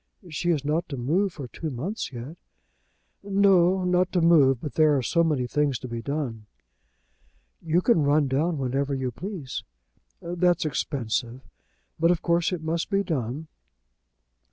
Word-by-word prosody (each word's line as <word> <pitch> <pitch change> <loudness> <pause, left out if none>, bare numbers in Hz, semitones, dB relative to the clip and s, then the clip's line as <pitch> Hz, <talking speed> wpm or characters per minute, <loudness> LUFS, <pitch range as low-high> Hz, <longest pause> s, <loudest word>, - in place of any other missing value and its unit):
"She 175 +3 -2
is 150 -5 +1
not 160 +4 -1
to 140 - -5
move 170 +11 +1
for 140 -5 -7
two 160 +6 -5
months 150 - -4
yet." 125 +5 -8 0.9
"No, 195 -2 +3
not 180 0 +2
to 180 - +3
move; 145 -7 +5
but 145 +2 -6
there 155 -2 +4
are 130 - -1
so 170 +6 +2
many 150 -6 +1
things 145 0 0
to 130 - -8
be 115 -1 -5
done." 125 -6 -4 1.1
"You 165 +2 +1
can 210 -5 +3
run 145 0 +3
down 155 +5 0
whenever 135 +1 -1
you 130 -1 -2
please?" 170 - -6 0.6
"That's 175 0 +1
expensive; 125 -4 -2 0.6
but 165 +1 +4
of 175 -2 +1
course 170 0 +2
it 175 -3 -4
must 165 +1 -2
be 200 0 +1
done." 145 - -3
155 Hz, 155 wpm, -26 LUFS, 135-175 Hz, 1.1 s, move